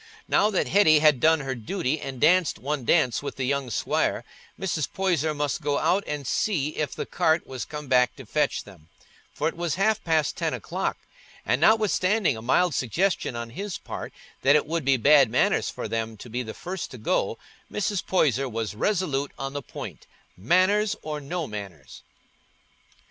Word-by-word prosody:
Now 210 Hz, -, +3 dB
that 195 Hz, -, 0 dB
Hetty 175 Hz, -6 st, +5 dB
had 150 Hz, -3 st, +4 dB
done 160 Hz, +3 st, +4 dB
her 135 Hz, -1 st, -3 dB
duty 145 Hz, -, -2 dB
and 135 Hz, -2 st, -6 dB
danced 170 Hz, +3 st, +4 dB
one 140 Hz, -2 st, -3 dB
dance 125 Hz, -7 st, +3 dB
with 145 Hz, -, -5 dB
the 135 Hz, -, -3 dB
young 140 Hz, 0 st, -1 dB
squire, 110 Hz, -, 0 dB, 0.4 s
Mr. 165 Hz, -6 st, -2 dB
Poyser 165 Hz, -5 st, 0 dB
must 145 Hz, +2 st, -2 dB
go 145 Hz, -1 st, 0 dB
out 180 Hz, +6 st, +2 dB
and 145 Hz, -2 st, -4 dB
see 150 Hz, -, 0 dB
if 155 Hz, -1 st, -3 dB
the -, -, -4 dB
cart 165 Hz, -2 st, +1 dB
was 130 Hz, -2 st, -6 dB
come 150 Hz, -1 st, -7 dB
back 125 Hz, -1 st, +3 dB
to 135 Hz, -, -11 dB
fetch 150 Hz, +7 st, 0 dB
them, 85 Hz, -6 st, -16 dB, 0.4 s
for 155 Hz, -, -1 dB
it -, -, -3 dB
was 170 Hz, -2 st, -2 dB
half 215 Hz, +3 st, +1 dB
past 160 Hz, -3 st, +1 dB
ten -, -, -1 dB
o'clock, -, -, -3 dB, 0.5 s
and 125 Hz, +6 st, +1 dB
notwithstanding 210 Hz, -, +3 dB
a 110 Hz, -, -8 dB
mild 160 Hz, +8 st, +2 dB
suggestion 160 Hz, -, 0 dB
on 115 Hz, 0 st, -5 dB
his 200 Hz, -, -5 dB
part -, -, -7 dB, 0.3 s
that 140 Hz, +2 st, +5 dB
it 150 Hz, -, +3 dB
would 165 Hz, +1 st, -2 dB
be 135 Hz, -1 st, +4 dB
bad 140 Hz, +2 st, +6 dB
manners -, -, +2 dB
for -, -, -5 dB
them 115 Hz, 0 st, -3 dB
to 115 Hz, +3 st, -11 dB
be 125 Hz, +2 st, -2 dB
the 110 Hz, -3 st, -7 dB
first 185 Hz, +1 st, -5 dB
to 125 Hz, -, -10 dB
go, 110 Hz, -, 0 dB, 0.3 s
Mrs. 210 Hz, -2 st, -1 dB
Poyser 135 Hz, -7 st, +1 dB
was 110 Hz, -2 st, -3 dB
resolute 145 Hz, -, -1 dB
on 135 Hz, 0 st, -4 dB
the 145 Hz, -, -3 dB
point, -, -, -9 dB, 0.3 s
"manners 190 Hz, -, +2 dB
or 150 Hz, -1 st, -4 dB
no 165 Hz, +4 st, -3 dB
manners." 100 Hz, -, -9 dB
150 Hz, 185 wpm, -25 LUFS, 125-180 Hz, 0.5 s, bad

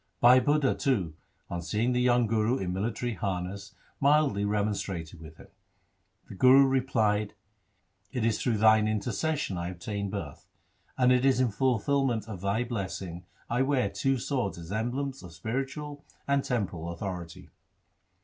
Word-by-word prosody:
Bhai 125 Hz, +2 st, +7 dB
Budha, 145 Hz, 0 st, +2 dB
too, 100 Hz, -, 0 dB, 0.3 s
on 85 Hz, -, -4 dB
seeing 110 Hz, +8 st, 0 dB
the 125 Hz, 0 st, +1 dB
young 125 Hz, -1 st, +3 dB
Guru 110 Hz, +3 st, +1 dB
in 90 Hz, -5 st, -3 dB
military 115 Hz, +5 st, -2 dB
harness 100 Hz, +1 st, -4 dB, 0.2 s
mildly 140 Hz, -7 st, +3 dB
remonstrated 100 Hz, -5 st, -2 dB
with 80 Hz, 0 st, -12 dB
him. -, -, -15 dB, 0.8 s
The -, -, -10 dB
Guru 130 Hz, +7 st, +6 dB
replied, 110 Hz, -6 st, +1 dB, 0.4 s
' 95 Hz, +1 st, -43 dB
It 125 Hz, -3 st, -1 dB
is 115 Hz, -2 st, +1 dB
through 120 Hz, -4 st, +1 dB
thine 110 Hz, 0 st, +5 dB
intercession 110 Hz, -, -1 dB
I 85 Hz, 0 st, -3 dB
obtained 100 Hz, +3 st, -4 dB
birth; 100 Hz, 0 st, -7 dB, 0.5 s
and 125 Hz, -1 st, +4 dB
it 125 Hz, 0 st, +3 dB
is 135 Hz, -2 st, +3 dB
in 125 Hz, -3 st, +2 dB
fulfilment 125 Hz, 0 st, +1 dB
of 100 Hz, -5 st, -7 dB
thy 100 Hz, +4 st, 0 dB
blessing 95 Hz, -6 st, -5 dB, 0.2 s
I 120 Hz, +2 st, 0 dB
wear 135 Hz, -6 st, +1 dB
two 135 Hz, 0 st, 0 dB
swords 120 Hz, -6 st, -2 dB
as 85 Hz, +1 st, -9 dB
emblems 130 Hz, +5 st, -2 dB
of 90 Hz, -3 st, -11 dB
spiritual 135 Hz, -, -4 dB, 0.2 s
and 140 Hz, -1 st, +2 dB
temporal 90 Hz, -9 st, -2 dB
authority. 85 Hz, -1 st, -6 dB
110 Hz, 150 wpm, -28 LUFS, 95-130 Hz, 0.8 s, Bhai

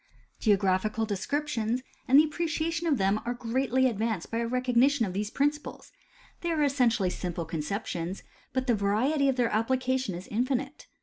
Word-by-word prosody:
Geographical 205 Hz, +1 st, +2 dB
descriptions 240 Hz, +2 st, -2 dB, 0.2 s
and 265 Hz, -, +6 dB
the -, -, +7 dB
appreciation 330 Hz, +1 st, -2 dB
of 295 Hz, -4 st, +3 dB
them 195 Hz, +1 st, +1 dB
are 245 Hz, +1 st, -2 dB
greatly 255 Hz, +2 st, +1 dB
advanced 220 Hz, -5 st, -2 dB
by 230 Hz, -, -1 dB
a 235 Hz, -, -1 dB
recognition 250 Hz, +1 st, +2 dB
of 185 Hz, -, -5 dB
these 205 Hz, +2 st, -2 dB
principles; 290 Hz, +4 st, -2 dB, 0.5 s
they 345 Hz, -, -2 dB
are 315 Hz, -3 st, +1 dB
essentially 240 Hz, -9 st, +2 dB
simple 175 Hz, -2 st, -4 dB
conceptions, 170 Hz, +2 st, -4 dB, 0.3 s
but 260 Hz, -1 st, -1 dB
the 245 Hz, -, +3 dB
variety 235 Hz, +8 st, +2 dB
of 265 Hz, -, +1 dB
their 245 Hz, -2 st, +1 dB
ap 220 Hz, +2 st, +1 dB
plication 260 Hz, -5 st, 0 dB
is 180 Hz, +2 st, -8 dB
infinite. 255 Hz, +4 st, -2 dB
240 Hz, 165 wpm, -28 LUFS, 205-275 Hz, 0.5 s, the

